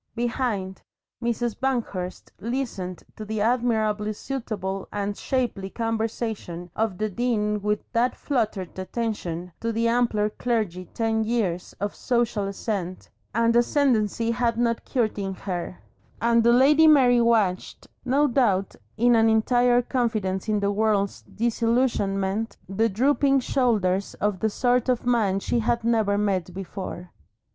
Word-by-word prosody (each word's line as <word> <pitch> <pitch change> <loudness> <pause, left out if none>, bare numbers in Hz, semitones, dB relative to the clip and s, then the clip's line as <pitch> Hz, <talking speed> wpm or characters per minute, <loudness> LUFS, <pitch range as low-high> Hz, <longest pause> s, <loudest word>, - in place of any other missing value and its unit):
Behind, 230 -5 -2 0.4
Mrs. 235 -1 -1
Banghurst 225 -9 -3
listened 225 -7 -4
to 215 - -7
the 215 0 -3
admirably 220 -2 +1
suitable 205 -6 -4
and 205 0 -2
shapely 235 -8 -2
conversation 220 -6 -3
of 220 -4 -1
the 215 - 0
Dean 210 -1 -1
with 210 +1 0
that 245 +1 +1
fluttered 215 - -2
attention 185 -4 -3
to 230 - -1
the 230 +1 +1
ampler 230 -3 +2
clergy 215 -7 -2
ten 225 -1 +1
years 210 -6 -1
of 205 0 -2
social 235 -5 0
ascent 195 -3 -4 0.2
and 230 0 +3
ascendency 235 -3 +2
had 235 -1 0
not 235 -1 0
cured 230 -5 -1
in 195 -1 -3
her; 180 -2 -5 0.4
and 235 0 +3
the 235 - +5
Lady 290 +6 +6
Mary 255 -5 +6
watched, 215 -6 +1 0.2
no 275 +3 +2
doubt 220 -8 +1 0.2
with 240 +2 +4
an 225 0 +4
entire 245 +2 +3
confidence 220 -6 -1
in 210 -1 +1
the 200 0 +1
world's 205 -1 0
disillusionment, 225 -3 0
the 215 +5 +1
drooping 275 +5 +3
shoulders 210 -8 0
of 205 -2 -1
the 220 - +1
sort 245 +3 +1
of 250 -2 0
man 220 -6 +2
she 235 - 0
had 235 +1 0
never 220 -3 +2
met 195 -3 0
before. 185 -1 -6
220 Hz, 135 wpm, -25 LUFS, 200-240 Hz, 0.4 s, Lady